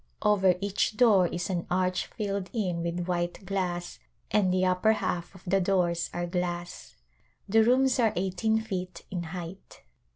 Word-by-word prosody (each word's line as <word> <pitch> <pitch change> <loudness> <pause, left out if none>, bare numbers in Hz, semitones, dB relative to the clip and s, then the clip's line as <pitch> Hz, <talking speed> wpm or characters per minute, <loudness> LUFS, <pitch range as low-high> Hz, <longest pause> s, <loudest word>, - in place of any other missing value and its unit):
Over 195 -4 +4
each 200 +1 0
door 210 -8 +5
is 175 +3 -3
an 175 -2 -2
arch 185 0 0
filled 200 -3 -3
in 185 -7 -1
with 170 +1 -2
white 175 +1 -2
glass 180 -2 -3 0.3
and 200 -4 +3
the 185 0 +2
upper 185 +4 +3
half 175 -3 -3
of 185 - -14
the 195 +2 +2
doors 175 -2 +1
are 175 0 -2
glass. 175 0 -4 0.5
The 220 +2 +5
rooms 255 +2 +3
are 225 -3 +4
eighteen 190 +4 +1
feet 185 -5 -5
in 180 -2 -2
height. 180 +2 -8
185 Hz, 160 wpm, -28 LUFS, 175-200 Hz, 0.5 s, door